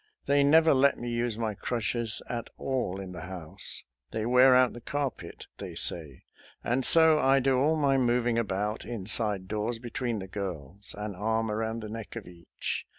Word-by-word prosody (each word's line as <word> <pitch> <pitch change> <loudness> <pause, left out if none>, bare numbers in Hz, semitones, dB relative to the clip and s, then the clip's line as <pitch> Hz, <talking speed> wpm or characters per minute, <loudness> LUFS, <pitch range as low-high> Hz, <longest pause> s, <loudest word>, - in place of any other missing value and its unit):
They 140 0 +3
never 160 +3 +5
let 140 +1 +3
me 120 0 -5
use 120 -1 -1
my 110 -2 -2
crutches 115 +1 -2
at 120 -2 -5
all 125 -8 -2
in 95 -1 -7
the 90 - -8
house, 85 -2 -5
— - - -59
they 110 -1 -2
wear 125 +2 +6
out 125 -1 +4
the 120 - -10
carpet, 130 -11 -4
they - - -7
say, 75 -7 -1 0.2
— - - -26
and 125 +2 0
so 160 +2 +6
I 135 0 +4
do 130 -1 +2
all 155 +4 +3
my 140 -3 +2
moving 120 -1 +2
about, 105 0 -2
inside 105 -3 0
doors, 110 +3 -2
between 120 0 -3
the 95 -2 -6
girls, 95 -1 -6
an 105 0 -4
arm 110 +3 -1
around 110 +1 -2
the - - -5
neck 115 -1 -7
of - - -6
each. 85 -1 -6
115 Hz, 190 wpm, -28 LUFS, 100-130 Hz, 0.2 s, wear